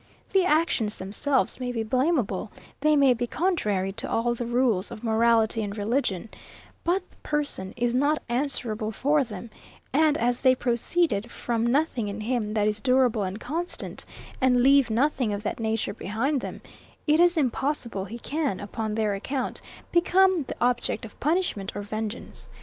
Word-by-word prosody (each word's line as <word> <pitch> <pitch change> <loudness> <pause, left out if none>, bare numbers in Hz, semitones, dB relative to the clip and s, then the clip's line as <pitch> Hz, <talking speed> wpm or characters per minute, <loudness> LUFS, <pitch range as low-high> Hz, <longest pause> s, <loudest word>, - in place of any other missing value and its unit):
The 385 -1 +5
actions 305 -10 +1
themselves 245 +9 0
may 250 -1 -2
be 230 -2 -2
blameable; 245 - 0 0.3
they 305 +1 +3
may 275 -3 +5
be 240 0 -2
contrary 210 - 0
to 215 +3 -5
all 240 +1 +1
the 240 0 -4
rules 235 -5 +1
of 235 -1 -9
morality 225 0 +3
and 205 0 -4
religion: 220 -2 -1 0.5
But 365 +2 0
the - - -23
person 285 -11 -2
is 240 0 +1
not 285 +4 +2
answerable 240 -4 -2
for 285 +6 +2
them; 220 -1 -8 0.4
and 305 +1 +4
as 245 +1 +1
they 260 -1 +5
proceeded 240 -1 0
from 235 -1 -1
nothing 255 -4 +1
in 205 +1 -5
him 220 -2 -1
that 210 -1 +2
is 215 0 -1
durable 255 -4 +3
and 195 +2 -3
constant, 330 +9 -3 0.4
and 250 -1 +4
leave 275 -1 +5
nothing 250 -1 +1
of 205 0 -4
that 210 - -3
nature 225 -1 -1
behind 250 +8 -1
them, - - -6 0.4
it 305 +1 +3
is 350 0 +5
impossible 255 -6 -1
he 220 +4 -7
can, 285 -3 -2
upon 215 +1 -4
their 215 -2 +1
account, 255 +6 -3 0.3
become 360 -1 +4
the - - -5
object 245 -2 0
of 215 - -13
punishment 300 - -1
or 205 - -4
vengeance. 215 +2 -6
240 Hz, 165 wpm, -26 LUFS, 215-285 Hz, 0.5 s, The